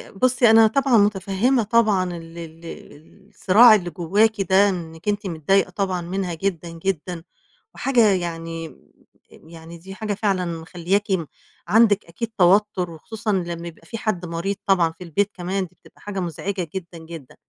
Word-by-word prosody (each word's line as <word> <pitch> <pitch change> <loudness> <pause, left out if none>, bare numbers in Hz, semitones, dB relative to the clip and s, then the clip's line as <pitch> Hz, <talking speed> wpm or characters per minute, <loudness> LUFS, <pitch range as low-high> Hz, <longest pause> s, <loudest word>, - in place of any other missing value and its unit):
بُصّي 245 +1 +3
أنا 225 0 +7
طبعًا 265 0 +2
مُتفهِّمة 205 +4 +2
طبعًا 215 -3 +2
ال 165 0 -12
ال 165 0 -10
ال 165 +5 -13
الصراع 215 +3 +6
اللي 180 -4 -2
جوّاكِ 200 +6 +1
ده، 195 +2 +4
إنِّك 165 -1 -6
أنتِ 205 -1 -1
متضايقة 180 +4 +1
طبعًا 185 -1 -2
منها 180 +1 -3
جدًا، 170 -1 -3
جدًا 170 0 -4 0.5
وحاجة 245 -5 +3
يعني 165 -2 -4
م 160 - -22
يعني 165 0 -11
دي 190 +3 -11
حاجة 210 0 -3
فعلًا 195 -3 0 0.2
مخلِّياكِ 180 +5 -2
م 180 -4 0 0.4
عندِك 210 0 +4
أكيد 215 +7 -6
توتُّر، 185 -1 +3
وخصوصًا 215 +7 -5
لمّا 170 -2 -3
يبقى 165 - -12
في 230 - -6
حد 200 -5 -2
مريض 170 +4 -3
طبعًا 180 -5 +3
في 170 - -12
البيت 200 +5 -1
كمان، 185 +1 -3
دي 180 - -30
بتبقى - - -22
حاجة 205 -2 -5
مزعجة 180 +1 -4
جدًا، 175 -2 -6
جدًا. 160 -4 -11
190 Hz, 160 wpm, -22 LUFS, 170-205 Hz, 0.5 s, أنا